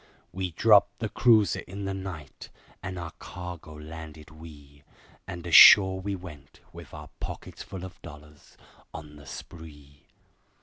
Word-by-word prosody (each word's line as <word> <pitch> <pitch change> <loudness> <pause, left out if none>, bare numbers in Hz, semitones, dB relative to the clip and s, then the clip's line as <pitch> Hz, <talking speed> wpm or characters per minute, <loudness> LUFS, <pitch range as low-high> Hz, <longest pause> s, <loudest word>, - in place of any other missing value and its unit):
We 90 +1 -4
dropped 100 +3 +4
the 110 - -4
cruiser 110 -3 +3
in 100 +1 -8
the 95 - -3
night, 90 -7 -9 0.3
and 95 -2 -6
our 85 -2 -6
cargo 90 -3 -9
landed 80 0 -11
we, 75 -3 -15 0.5
And 85 -1 -8
ashore 95 +2 +8
we 100 +1 -3
went, 75 -6 -13
with - - -12
our - - -11
pockets - - -8
full 95 -1 -8
of 95 -2 -13
dollars, 75 -2 -15 0.4
on 75 -1 -10
the 70 -1 -15
spree. 75 -3 -12
85 Hz, 140 wpm, -27 LUFS, 75-95 Hz, 0.5 s, ashore